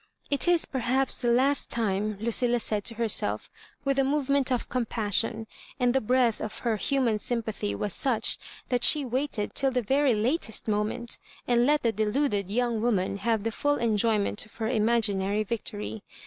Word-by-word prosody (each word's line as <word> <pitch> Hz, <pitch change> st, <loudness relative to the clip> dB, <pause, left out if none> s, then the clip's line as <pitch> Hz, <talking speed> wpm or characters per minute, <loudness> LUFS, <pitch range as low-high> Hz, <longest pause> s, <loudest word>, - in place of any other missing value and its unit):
"It 285 Hz, +4 st, +1 dB
is 350 Hz, -2 st, +4 dB
prhaps 260 Hz, +1 st, -1 dB
the 240 Hz, -, +1 dB
last 265 Hz, +4 st, +2 dB
time," 210 Hz, -2 st, -1 dB
Lucilla 235 Hz, +2 st, +1 dB
said 210 Hz, -2 st, -1 dB
to 230 Hz, -, 0 dB
her 230 Hz, +1 st, 0 dB
self 215 Hz, -, 0 dB, 0.3 s
with 275 Hz, 0 st, +1 dB
a -, -, +4 dB
movement 275 Hz, -1 st, +1 dB
of 250 Hz, -, 0 dB
compassion; 225 Hz, -2 st, 0 dB, 0.3 s
and 245 Hz, -1 st, +2 dB
the 265 Hz, -, +2 dB
breadth 245 Hz, 0 st, +2 dB
of 215 Hz, -, -5 dB
her 225 Hz, -2 st, +1 dB
human 245 Hz, -2 st, +1 dB
sympathy 220 Hz, -, -3 dB
was 205 Hz, -, -3 dB
such 240 Hz, -5 st, +1 dB, 0.3 s
thai 245 Hz, -, +1 dB
she 295 Hz, +2 st, +4 dB
waited 255 Hz, -3 st, -2 dB
till 270 Hz, -, +2 dB
the 250 Hz, -2 st, -1 dB
very 270 Hz, +1 st, +2 dB
latest 225 Hz, +2 st, -1 dB
moment, 215 Hz, +3 st, -1 dB, 0.3 s
and 240 Hz, 0 st, +3 dB
let 295 Hz, 0 st, +2 dB
the 230 Hz, -, +3 dB
deluded 210 Hz, -1 st, 0 dB
young 235 Hz, 0 st, 0 dB
woman 200 Hz, -4 st, 0 dB
have 220 Hz, +1 st, 0 dB
the 225 Hz, -, -1 dB
full 290 Hz, +5 st, 0 dB
enjoy 225 Hz, -2 st, +2 dB
ment 205 Hz, 0 st, -1 dB
of 220 Hz, -, -18 dB
her 220 Hz, -1 st, -2 dB
imaginary 215 Hz, -3 st, +1 dB
victory. 110 Hz, -, -4 dB
235 Hz, 175 wpm, -27 LUFS, 215-260 Hz, 0.3 s, is